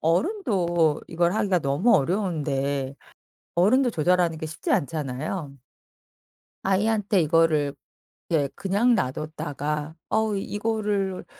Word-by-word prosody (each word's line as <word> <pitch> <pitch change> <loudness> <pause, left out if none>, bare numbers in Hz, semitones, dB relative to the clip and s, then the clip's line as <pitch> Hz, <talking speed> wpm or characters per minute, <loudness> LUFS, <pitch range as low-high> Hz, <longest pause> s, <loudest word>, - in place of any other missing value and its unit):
어른도 175 - +1
이걸 170 +1 +1
하기가 205 -4 +2
너무 150 - +3
어려운데 140 -6 -1 0.6
어른도 245 +10 +4
조절하는 175 -2 +2
게 160 - -6
쉽지 155 +1 -3
않잖아요. 145 +1 -2 1.1
아이한테 205 +1 +2
이거를 155 -3 +2 0.6
예 145 -4 +2
그냥 210 +5 +2
놔 130 -10 0
뒀다가 150 +1 -4
'어 220 -1 +1
이거를 205 -2 -2
170 Hz, 240 characters per minute, -25 LUFS, 150-205 Hz, 1.1 s, 어른도